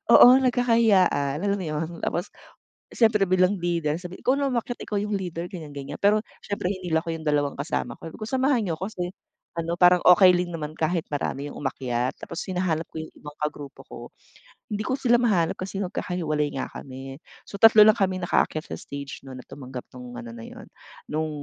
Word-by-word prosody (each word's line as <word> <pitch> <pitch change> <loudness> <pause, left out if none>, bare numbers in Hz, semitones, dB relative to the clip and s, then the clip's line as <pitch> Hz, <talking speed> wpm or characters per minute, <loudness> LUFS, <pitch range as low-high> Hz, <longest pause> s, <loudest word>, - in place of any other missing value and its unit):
oo, - - +10
nagkakahiyaan, 220 - +3
alam 200 0 0
mo 185 - -4
yun? 155 +1 -2
Tapos, 175 - -2 0.6
siyempre 220 -3 +3
bilang 185 +1 +3
leader 170 -4 -1
sabi 180 +2 -8
ikaw 255 - +2
na 280 -1 0
umakyat, 245 0 -2
ikaw 205 - -2
yung 210 +1 -2
leader 175 -3 -4
ganiyan, 165 -5 -8
ganiyan. 140 0 -7
Pero 210 +2 +5 0.2
siyempre 200 -3 -3
hinila 175 -4 0
ko 165 - -3
yung 160 - -8
dalawang 145 -1 +1
kasama 145 +6 -3
ko, 165 - -9
sabi - - -12
ko," 215 - -4
Samahan 260 0 +2
niyo 165 - -1
ko 185 +5 -4
kasi" 180 -3 -4 0.5
ano 165 0 -1
parang 180 0 +5
okey 180 0 +7
lang 175 -1 -2
naman 155 -1 -5
kahit 165 +2 0
marami 145 0 -3
yung - - -10
umakyat 130 -2 -2
tapos 170 - -6
hinahanap 180 -3 -1
ko 160 - -4
yung 160 - -8
ibang 150 0 -10
kagrupo 145 -2 -5
ko, - - -9 0.7
hindi 210 - -2
ko 260 - 0
sila 240 -2 +3
mahanap 185 -9 +2
kasi 190 +1 -5
magkakahiwalay 160 -5 -2
nga - - -2
kami, 135 +1 -9 0.3
so 200 - -9
3 220 -1 +9
lang 215 - +7
kaming 190 -4 -1
nakaakyat 155 -2 +1
sa - - -8
stage 140 -2 -8
nun 135 -1 -10
na 125 - -11
tumanggap 130 -3 -9
nung 125 -1 -9
ano 115 -1 -8
na 115 - -9
yun, - - -11 0.4
nung 155 +1 -2
175 Hz, 200 wpm, -25 LUFS, 150-200 Hz, 0.7 s, oo